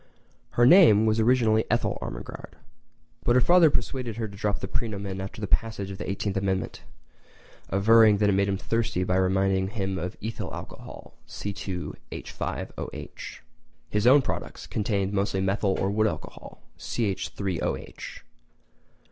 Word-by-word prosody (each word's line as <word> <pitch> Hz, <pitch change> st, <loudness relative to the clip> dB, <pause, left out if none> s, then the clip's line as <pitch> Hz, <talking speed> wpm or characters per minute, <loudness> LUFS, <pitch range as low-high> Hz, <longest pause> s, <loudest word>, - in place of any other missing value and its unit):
Her 120 Hz, -, +6 dB
name 125 Hz, -, +7 dB
was 110 Hz, 0 st, +2 dB
originally 110 Hz, -2 st, +3 dB
Ethyl -, -, 0 dB
Ermengarde, -, -, -7 dB, 0.7 s
but 120 Hz, -, +3 dB
her -, -, +7 dB
father 170 Hz, +5 st, +6 dB
persuaded 125 Hz, -3 st, -2 dB
her 115 Hz, -1 st, -2 dB
to 100 Hz, -, -11 dB
drop 105 Hz, 0 st, -1 dB
the -, -, -4 dB
praenomen 100 Hz, -4 st, -3 dB
after 95 Hz, +2 st, -7 dB
the 105 Hz, -, -2 dB
passage 100 Hz, -3 st, -1 dB
of 95 Hz, -, -8 dB
the -, -, -4 dB
18th 100 Hz, +1 st, -2 dB
Amendment, 95 Hz, -1 st, -2 dB, 0.9 s
averring 105 Hz, +2 st, +6 dB
that 105 Hz, 0 st, +2 dB
it -, -, +4 dB
made 100 Hz, +1 st, +2 dB
him 100 Hz, -, 0 dB
thirsty 115 Hz, -2 st, -1 dB
by 90 Hz, 0 st, 0 dB
reminding 95 Hz, 0 st, +2 dB
him 95 Hz, -3 st, -3 dB
of 90 Hz, 0 st, -5 dB
ethyl 110 Hz, +2 st, -5 dB
alcohol, -, -, -10 dB
C2H5OH. 100 Hz, -3 st, -6 dB, 0.5 s
His 105 Hz, +2 st, +2 dB
own 135 Hz, +2 st, +7 dB
products -, -, -5 dB
contained 100 Hz, -2 st, -1 dB
mostly 100 Hz, -1 st, 0 dB
methyl 95 Hz, +1 st, +1 dB
or 95 Hz, -, 0 dB
wood 110 Hz, +1 st, +2 dB
alcohol, 80 Hz, -7 st, -7 dB, 0.2 s
CH3OH. 100 Hz, -4 st, -3 dB
100 Hz, 140 wpm, -26 LUFS, 95-115 Hz, 0.9 s, name